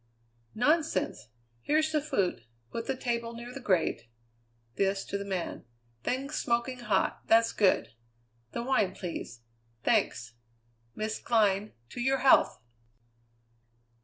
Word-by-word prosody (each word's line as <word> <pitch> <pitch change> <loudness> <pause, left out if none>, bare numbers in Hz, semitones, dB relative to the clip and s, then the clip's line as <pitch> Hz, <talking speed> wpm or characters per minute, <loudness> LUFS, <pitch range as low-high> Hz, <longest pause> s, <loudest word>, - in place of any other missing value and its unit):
"Nonsense! 310 +7 +1 0.3
Here's 310 - +2
the 305 -1 +2
food. 195 - -1 0.3
Put 230 - -4
the 270 - 0
table 235 -2 -2
near 240 +1 -8
the 275 - -6
grate" 170 - +1 0.7
this 195 +5 0
to - - -5
the 200 - -1
man 190 -3 -3 0.4
"things 270 +3 -2
smoking 240 +2 0
hot; 210 -5 0
that's 230 0 +5
good. 195 - +2 0.6
The 235 - -3
wine, 215 -7 +1
please. 165 - -6 0.4
Thanks! 115 -1 +1 0.6
Miss 215 0 -2
Glynn, 210 -3 +2 0.2
to 245 - -6
your 265 +2 +2
health!" 265 - +5
230 Hz, 120 wpm, -30 LUFS, 195-260 Hz, 0.7 s, that's